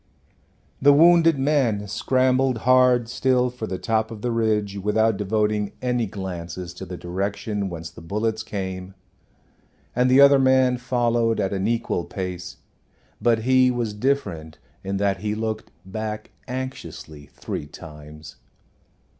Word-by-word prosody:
The 145 Hz, +1 st, +7 dB
wounded 165 Hz, 0 st, +6 dB
man 135 Hz, -8 st, +1 dB
scrambled 130 Hz, +3 st, +1 dB
hard 125 Hz, -2 st, +4 dB
still 125 Hz, +1 st, +1 dB
for 115 Hz, -3 st, -6 dB
the 95 Hz, -, -3 dB
top 110 Hz, +1 st, 0 dB
of 110 Hz, -2 st, -9 dB
the 120 Hz, -, 0 dB
ridge 105 Hz, -3 st, 0 dB
without 110 Hz, +2 st, +2 dB
devoting 105 Hz, 0 st, -1 dB
any 125 Hz, -2 st, 0 dB
glances 90 Hz, -3 st, -6 dB
to 95 Hz, +1 st, -9 dB
the 90 Hz, 0 st, -6 dB
direction 100 Hz, +3 st, -3 dB
whence 85 Hz, -1 st, -7 dB
the 85 Hz, -, -13 dB
bullets 110 Hz, +6 st, -2 dB
came, 95 Hz, -3 st, -5 dB, 1.0 s
and 125 Hz, +1 st, +3 dB
the 130 Hz, +2 st, +5 dB
other 140 Hz, 0 st, +7 dB
man 130 Hz, -1 st, +4 dB
followed 120 Hz, -2 st, +1 dB
at 95 Hz, -, 0 dB
an 95 Hz, +1 st, -1 dB
equal 115 Hz, -6 st, -1 dB
pace; 90 Hz, -1 st, -6 dB, 0.6 s
but 115 Hz, -2 st, +2 dB
he 130 Hz, +1 st, +4 dB
was 120 Hz, -4 st, -2 dB
different, 105 Hz, -, -2 dB, 0.3 s
in 95 Hz, +1 st, -2 dB
that 100 Hz, -1 st, +1 dB
he 105 Hz, 0 st, -2 dB
looked 110 Hz, 0 st, -4 dB, 0.2 s
back 110 Hz, +2 st, -5 dB, 0.2 s
anxiously 125 Hz, -, -7 dB
three 75 Hz, -, -6 dB
times. 75 Hz, 0 st, -12 dB
110 Hz, 140 wpm, -23 LUFS, 95-125 Hz, 1.0 s, The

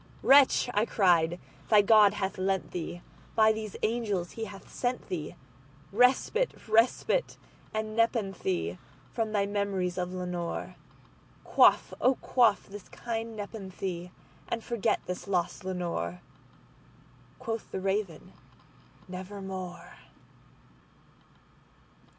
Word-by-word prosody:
"Wretch," 275 Hz, -2 st, +6 dB
I 210 Hz, -, +3 dB
cried, 175 Hz, -3 st, +3 dB, 0.3 s
"thy 210 Hz, -2 st, +6 dB
God 210 Hz, -1 st, +6 dB
hath 195 Hz, -1 st, -3 dB
lent 190 Hz, 0 st, -1 dB
thee—by 180 Hz, +5 st, -1 dB
these 215 Hz, -2 st, -5 dB
angels 210 Hz, -6 st, -1 dB
he 225 Hz, -, -5 dB
hath 200 Hz, -3 st, -11 dB
sent 245 Hz, 0 st, -3 dB
theeRespite—respite 215 Hz, -, 0 dB, 0.3 s
and 215 Hz, 0 st, -3 dB
nepenthe 195 Hz, -, 0 dB, 0.3 s
from 225 Hz, -2 st, -2 dB
thy 205 Hz, -2 st, +1 dB
memories 200 Hz, -3 st, -1 dB
of 180 Hz, 0 st, -2 dB
Lenore!"Quaff, 180 Hz, -2 st, -1 dB
oh 260 Hz, -, +4 dB
quaff 240 Hz, -5 st, +2 dB
this 200 Hz, -1 st, -11 dB
kind 230 Hz, -1 st, -4 dB
nepenthe, 190 Hz, -4 st, -5 dB, 0.4 s
and 230 Hz, -, -3 dB
forget 235 Hz, -4 st, 0 dB
this 180 Hz, +2 st, -5 dB
lost 180 Hz, -3 st, -1 dB
Lenore."Quoth 185 Hz, +5 st, -7 dB
the -, -, -4 dB
Raven, 195 Hz, -3 st, -2 dB, 0.7 s
"Nevermore." 185 Hz, -1 st, -7 dB
200 Hz, 90 wpm, -29 LUFS, 180-220 Hz, 0.7 s, Wretch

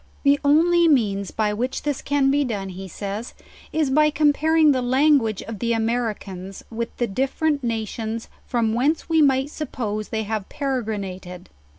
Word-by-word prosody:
The 285 Hz, 0 st, +4 dB
only 335 Hz, +4 st, +4 dB
means 205 Hz, -, +2 dB
by 210 Hz, -1 st, 0 dB
which 250 Hz, +5 st, -3 dB
this 290 Hz, -2 st, -2 dB
can 280 Hz, -1 st, +2 dB
be 290 Hz, +1 st, +2 dB
done, 205 Hz, -7 st, -3 dB
he 190 Hz, +1 st, -7 dB
says, 200 Hz, +5 st, -6 dB, 0.4 s
is 310 Hz, -4 st, 0 dB
by 300 Hz, +2 st, +4 dB
comparing 305 Hz, +1 st, +3 dB
the 260 Hz, -2 st, +1 dB
language 255 Hz, -4 st, +2 dB
of 225 Hz, -3 st, -7 dB
the 235 Hz, -1 st, 0 dB
Americans 220 Hz, -5 st, -3 dB
with 230 Hz, +1 st, -5 dB
the 240 Hz, -, +1 dB
different 275 Hz, +6 st, -1 dB
nations 225 Hz, 0 st, -3 dB, 0.2 s
from 230 Hz, -3 st, 0 dB
whence 280 Hz, +7 st, +1 dB
we 320 Hz, -1 st, +4 dB
might 270 Hz, 0 st, +3 dB
suppose 215 Hz, -9 st, -4 dB
they 220 Hz, -1 st, -2 dB
have 215 Hz, -2 st, -4 dB
peregrina 220 Hz, -10 st, -3 dB
ted. 180 Hz, -1 st, -11 dB
240 Hz, 165 wpm, -23 LUFS, 215-285 Hz, 0.4 s, The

